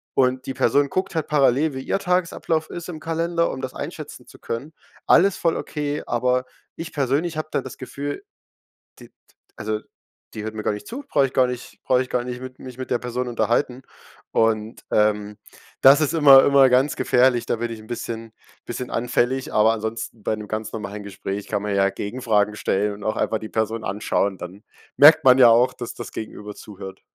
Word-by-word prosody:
und 130 0 +1
die 135 - -4
Person 140 +5 +2
guckt 185 +4 -2
halt 160 -2 -1
parallel, 145 +1 +2
wie 130 - -5
ihr 195 - -1
Tagesablauf 170 -3 -1
ist 175 +1 -7
im 160 -3 -6
Kalender, 170 +1 -1
um 130 - -6
das 130 - -6
einschätzen - - -7
zu - - -16
können. 140 +8 -5 0.3
Alles 195 +1 +5
voll 165 -1 +1
okay, 150 -1 -3
aber 125 +1 +1 0.3
ich 165 +1 -7
persönlich 145 +4 0
habe 155 0 -4
da - - 0
das 130 - -9
Gefühl: 140 +3 -6 0.8
„Die - - -13
d - - -44 0.4
also, 110 0 -3 0.5
die 105 - -6
hört 110 0 -5
mir 110 - -5
gar - - 0
nicht 105 - -8
zu, 275 +5 -7
brauche 140 - +3
ich 130 - -10
gar 130 - +4
nicht 125 0 -7
brauche 125 -1 +3
ich 130 - -9
gar 125 -1 0
nicht 125 0 -6
mit 130 0 -9
mich 130 -1 -10
mit 130 - -6
der 120 - +2
Person 125 0 -3
unterhalten.“ 120 +2 0 0.5
Und, 110 0 0
ähm, 105 -1 +1 0.5
das 135 +3 +8
ist 155 0 0
immer 140 -4 +8
immer 140 -1 +6
ganz 130 +3 +3
gefährlich, 125 -1 +3
da - - 0
bin 120 +1 -3
ich 115 - -6
'n 110 - -14
bisschen 115 -1 -6 0.3
bisschen 125 +1 -5
anfällig, 125 +2 0
aber 110 +1 +5
ansonsten 110 0 -5
bei - - 0
‘nem 105 -1 -8
ganz 110 0 -4
normalen 105 -1 -6
Gespräch 100 0 -6
kann 105 - -1
man 105 -1 -2
ja 100 0 +3
Gegenfragen 105 -1 -1
stellen 105 +1 0
und 100 - -11
auch 110 - -1
einfach 110 - 0
die 110 - -8
Person 110 0 -2
anschauen, 100 -1 -1
dann 95 +4 -9 0.3
merkt 155 +2 +8
man 130 0 +7
ja 125 -2 +8
auch, 120 +2 +4
dass 120 - -6
das - - -8
Gegenüber 105 -1 -7
zuhört. 95 -2 -10
125 Hz, 205 wpm, -22 LUFS, 110-140 Hz, 0.8 s, das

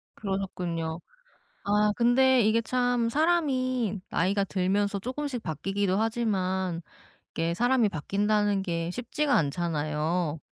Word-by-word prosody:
그러셨군요. 180 -5 -3 0.7
아 210 +1 +3
근데 255 +2 +4
이게 220 +1 +3
참 245 0 +1
사람이 255 - +1
나이가 195 +4 +1
들면서 200 +2 0
쪼끔씩 255 +2 -4
바뀌기도 195 +4 -1
하지만 190 -6 -1 0.5
이게 165 +1 -1
'사람이 245 +2 +3
바뀐다.'는 205 +3 0
게 170 -2 -2
쉽지가 280 +6 -1
않잖아요. 155 +1 0
200 Hz, 270 characters per minute, -27 LUFS, 180-240 Hz, 0.7 s, 근데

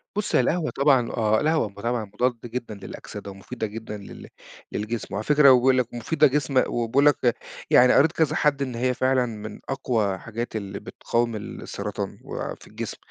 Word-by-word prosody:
بُص 210 0 -1
هي - - +6
القهوة 155 +5 0
طبعًا 135 -4 +3
آه، 110 -1 +2
القهوة 155 -9 +1
طبعًا 115 +2 -2
مضادة 120 +3 -2
جدًا 120 -2 -5
للأكسدة 100 0 -8
ومفيدة 105 +4 -5
جدًا 105 0 -7
لل 100 - -11 0.4
للجسم، 110 +1 -4
وعلى 100 - -2
فكرة 150 +4 +3
بيقول 130 +1 +5
لَك 125 -2 0
مفيدة 150 +6 +3
جسم 135 -2 +2
وبيقول 120 +5 +1
لَك، 125 -5 +3 0.3
يعني 125 0 +6
قريت 160 +3 +5
كذا 160 -3 +1
حد 145 -2 +2
إن 130 -3 -2
هي 125 +2 +1
فعلًا 130 0 +2
من 110 -2 -7
أقوى 115 -8 0
حاجات 115 +3 -6
اللي 100 -2 -4
بتقاوم 115 -1 -2
السرطان 105 - -5
وفي - - -6
الجسم، - - -6
120 Hz, 170 wpm, -25 LUFS, 110-135 Hz, 0.4 s, هي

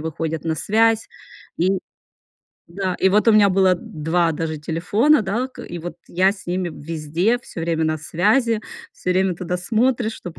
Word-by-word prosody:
выходят 160 0 -4
на 160 -1 0
связь. 225 +5 +2 0.5
И 185 +3 +2 0.9
да, 185 +1 -3
и 190 - +5
вот 210 +4 +2
у 225 - +7
меня 210 -2 +6
было 190 -1 +4
д 175 - -9
два 165 +2 0
даже 160 0 -3
телефона, 200 - +2
да. 225 +7 -2
К 260 - -11
и 175 - -7
вот 175 +2 -7
я 185 +2 +3
с 200 - -14
ними 180 0 -1
везде 165 +8 -1
всё 210 -8 -9
время 165 -1 0
на 155 0 0
связи, 215 - +1 0.3
всё 180 - -4
время 185 0 +2
туда 180 +1 -3
смотришь, 230 +4 0
чтоб 175 -2 -9
180 Hz, 180 wpm, -21 LUFS, 165-215 Hz, 0.9 s, у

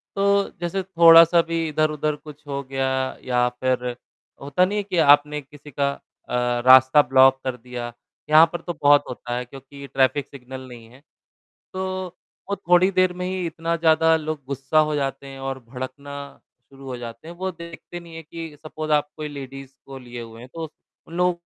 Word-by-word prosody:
तो 200 0 +2
जैसे 175 +3 -2
थोड़ा-सा 170 -2 +7
भी 165 0 -2
इधर-उधर 155 0 0
कुछ 150 0 -14
हो 140 -1 -3
गया 135 0 -2 0.4
या 125 -1 +1
फिर 125 0 -1 0.6
होता 145 +6 +2
नहीं 205 +3 -2
है 205 - 0
कि 190 -3 -4
आपने 150 -1 +4
किसी 145 +1 -15
का 140 +1 0 0.4
अ, 125 0 0
रास्ता 130 +3 +8
ब्लॉक 135 0 +5
कर 130 -1 -3
दिया? 120 0 -7 0.4
यहाँ 155 +2 +8
पर 175 - -4
तो 175 - -5
बहुत 145 0 +6
होता 120 -1 -5
है, 125 - -4
क्योंकि 135 +2 -12
ट्रैफ़िक 135 +1 +1
सिग्नल 130 -1 -9
नहीं 120 -2 -12
है। 130 +3 -18 0.7
तो, 185 -1 -4 0.3
वो 200 - 0
थोड़ी 180 -1 +3
देर 185 -1 +2
में 180 0 -5
ही 185 -1 -2
इतना 165 +1 -2
ज़्यादा 160 0 +4
लोग 155 -2 -5
गुस्सा 140 +3 0
हो 155 -1 +2
जाते 135 -1 -3
हैं 135 0 -10
और 135 0 -4
भड़कना 130 +3 -7 0.5
शुरू 135 0 -14
हो 125 -1 -5
जाते 115 +4 -9
हैं, 170 - -9
वो 190 +2 -3
देखते 170 0 -10
नहीं 170 -1 -13
है 165 - -8
कि 165 0 -8
सपोज़ 155 0 -5
आप 150 -1 +2
कोई 155 -1 -4
लेडीज़ 135 -2 -9
को 135 -1 -9
लिए 120 -1 -9
हुए 115 0 -11
हैं, 125 - -12
तो 165 -1 -5
स - - -23 0.4
उन 165 - -13
लोगों 180 0 +3
145 Hz, 195 wpm, -23 LUFS, 130-165 Hz, 0.7 s, रास्ता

